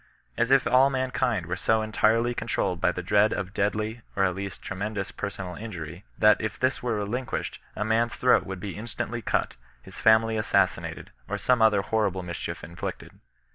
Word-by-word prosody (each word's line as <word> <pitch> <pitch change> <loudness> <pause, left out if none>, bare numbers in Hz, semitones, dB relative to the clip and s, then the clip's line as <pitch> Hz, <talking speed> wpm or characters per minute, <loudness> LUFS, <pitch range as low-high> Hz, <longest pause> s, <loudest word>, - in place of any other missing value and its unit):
As 120 - +1
if 135 0 +5
all 130 +2 +5
mankind 130 -7 0
were 90 +2 -2
so 110 +4 +1
entirely 115 +2 +2
control 120 - -1
led 90 -1 -6
by - - +3
the 90 +1 -5
dread 105 +3 +4
of 95 +1 -4
deadly, 110 +3 -1
or 95 - +2
at 95 -1 +2
least, 100 +1 -6
tremendous 100 +1 -4
per - - -4
sonal 95 -1 -7
injury, 90 -4 -7
that 105 -1 +5
if 110 - -3
this 130 +1 +1
were 120 -2 -1
relinquished 110 +5 -3 0.2
a 105 - -2
man's 115 +2 +1
throat 125 - +4
would 95 -2 -6
be 95 0 -5
instantly 115 +2 -4
cut, - - -1 0.3
his - - -11
fajnily 110 0 +4
assassinated, 105 - 0 0.2
or - - -1
some 125 -2 +2
other 105 -3 +4
horrible 100 -5 0
mischief 85 -1 -5
inflicted. 85 - -7
110 Hz, 185 wpm, -26 LUFS, 95-115 Hz, 0.3 s, if